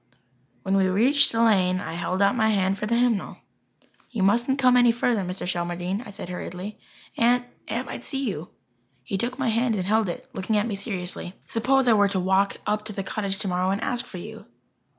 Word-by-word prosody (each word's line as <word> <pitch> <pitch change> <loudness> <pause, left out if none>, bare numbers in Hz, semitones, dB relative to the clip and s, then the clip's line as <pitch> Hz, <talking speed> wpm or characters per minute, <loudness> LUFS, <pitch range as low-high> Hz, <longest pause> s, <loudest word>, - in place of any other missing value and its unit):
When 195 0 +1
we 190 -1 +3
reached 255 +10 +4
the 230 0 +2
lane 185 -5 +3
I 190 - -5
held 180 +3 -1
out 200 +4 +3
my 220 -2 +2
hand 195 -2 +1
for 210 - -2
the 235 - +1
hymnal. 235 -4 +1 0.7
"You 220 -6 -2
mustn't 240 +7 +2
come 255 -2 +4
any 245 -1 +6
further, 235 -2 0
Mr. 180 +1 -5
Shelmardine," 175 +5 -3
I - - -8
said 200 - -8
hurriedly. 180 +3 -6 0.4
"Aunt 245 +1 +3 0.2
Aunt - - -2
might - - -7
see 270 -2 -3
you." 175 -5 -4 0.5
He 195 +9 -3
took 245 +4 -1
my 265 -3 0
hand 230 +1 +1
and 185 -3 -2
held 215 0 +2
it, 175 - -6
looking 210 +3 -1
at 205 - +1
me 230 - -3
seriously. 190 -2 -4
"Suppose 260 +3 +2
I 235 - +6
were 205 -1 +4
to 195 - -1
walk 190 +2 +2
up 210 0 -1
to 215 - -4
the 195 - -4
cottage 195 -1 -2
tomorrow 185 -2 0
and 195 +1 0
ask 245 -2 -2
for 185 - -8
you?" 220 +5 -9
205 Hz, 210 wpm, -25 LUFS, 190-235 Hz, 0.7 s, any